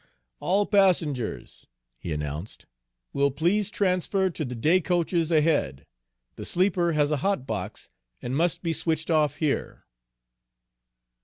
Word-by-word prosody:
"All 200 +3 +1
passengers," 165 - 0 0.3
he 85 - -6
announced, 75 +5 -5 0.5
"will 140 0 +2
please 175 +9 0
transfer 190 -1 0
to 160 - -4
the 125 -3 -5
day 160 +11 +3
coaches 170 -1 0
ahead. 150 - +1 0.5
The - - -6
sleeper 180 -2 +1
has 150 -1 +2
a 150 - +1
hot 195 -3 -1
box, - - -5 0.3
and 125 +2 -4
must 170 +4 0
be 165 -1 0
switched 160 +1 -1
off 150 -3 +2
here." 150 -3 -2
160 Hz, 130 wpm, -26 LUFS, 140-180 Hz, 0.5 s, day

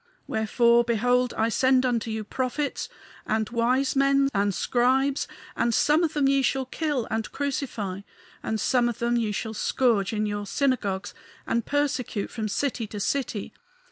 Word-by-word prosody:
Wherefore, 235 +2 +3
behold, 245 +2 +2
I 225 +1 +1
send 260 +2 +3
unto 235 -3 0
you 220 0 -3
prophets 260 +6 -3 0.4
and 220 0 0
wise 250 +4 +1
men 275 0 +3
and 200 0 +2
scribes; 260 +8 +1 0.3
and 235 -1 +1
some 305 +3 +3
of 320 - 0
them 290 -2 +2
ye 275 0 +3
shall 265 0 0
kill 285 -2 -2
and 220 0 -2
crucify, 240 -9 -3 0.4
and 220 - -2
some 245 0 +2
of 235 - -5
them 235 0 0
ye 225 -3 0
shall 220 +2 -3
scourge 225 -2 +1
in 215 -1 -1
your 205 -1 -3
synagogues 215 -8 -1 0.3
and 230 -1 -1
persecute 285 -7 -1
from 220 -2 -3
city 235 +1 -1
to 205 0 -7
city. 230 -2 -2
240 Hz, 160 wpm, -26 LUFS, 220-270 Hz, 0.4 s, Wherefore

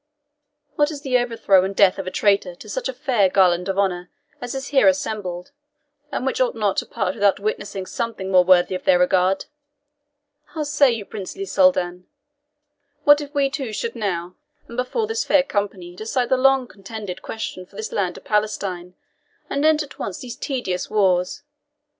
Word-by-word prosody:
What 295 0 +3
is 295 -3 -7
the 255 -2 +2
overthrow 225 -6 +3
and 195 +1 -3
death 195 -1 +4
of 190 - -5
a - - 0
traitor 195 -2 +1
to 215 - -13
such 210 - -3
a - - -3
fair 245 -7 +2
garland 180 -1 +3
of 190 - -1
honour 180 -3 0 0.3
as 245 +1 -5
is 270 +1 -5
here 280 -1 +4
assembled, 210 -10 -1 0.6
and - - -3
which 480 +1 0
ought - - +1
not - - 0
to - - -1
part - - -2
without 200 -2 +2
witnessing 200 -2 -3
something 215 -3 -4
more 180 -1 +6
worthy 180 0 +4
of 185 - -4
their 185 - +5
regard? 185 +1 +2 1.1
How 310 - -1
say 290 -1 +4
you, 225 -3 -4
princely 215 - -6
Soldan? 180 - +2 1.0
What 290 0 +6
if 290 -1 -8
we 280 -1 +3
two 270 -5 -4
should 230 +3 -3
now, 180 -5 -3 0.3
and 235 - -10
before 255 - -1
this 450 +2 -1
fair 290 -2 +4
company, 195 -7 -3
decide 230 +5 -2
the 260 - +4
long 265 0 +3
contended 195 -3 -8
question 185 -4 -6
for - - -22
this 215 +1 -5
land 185 -4 -1
of - - -13
Palestine, 195 -4 -2 0.6
and 280 - 0
end 310 0 +4
at 290 - -14
once 190 - -5
these 245 -2 -7
tedious 215 -10 -3
wars? 185 -2 +1
210 Hz, 185 wpm, -22 LUFS, 185-265 Hz, 1.1 s, more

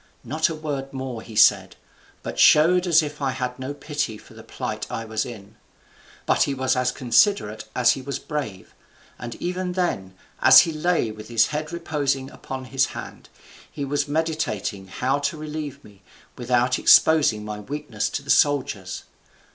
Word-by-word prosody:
Not 155 +6 0
a 165 - -4
word 140 -3 -5
more 130 -3 -5
he 110 - -12
said, 105 - +4 0.5
but - - -6
showed 180 +4 +5
as 165 -2 +5
if 150 0 -6
he 140 - -2
had 130 -1 -3
no 130 +2 -4
pity 145 -6 -4
for - - -17
the - - -12
plight - - -5
I 115 - -4
was 110 0 -2
in. 105 -2 -11 0.7
But - - +2
he 140 - +2
was 130 -1 0
as 125 0 +1
considerate 120 - +2
as 125 -1 +4
he 135 - -3
was 140 +1 -4
brave; 135 -12 -6 0.5
and 120 -1 -6
even 180 0 -3
then, 95 - -2 0.3
as - - +9
he 165 - -1
lay 155 -7 0
with 105 0 -10
his 115 -2 +3
head 155 +1 -4
reposing 145 -5 -2
upon 130 -1 -7
his 135 +1 +1
hand, - - -9 0.4
he 145 - -4
was 145 +1 -1
meditating 145 -11 -2
how 130 +8 -1
to 145 +2 -2
relieve 150 -2 -6
me, 100 -2 -18 0.3
without 125 +1 +1
exposing 145 -10 +5
my 105 0 -5
weakness 130 -2 -4
to 140 - -4
the 140 - -1
soldiers. 125 -10 +1
135 Hz, 170 wpm, -23 LUFS, 115-150 Hz, 0.7 s, as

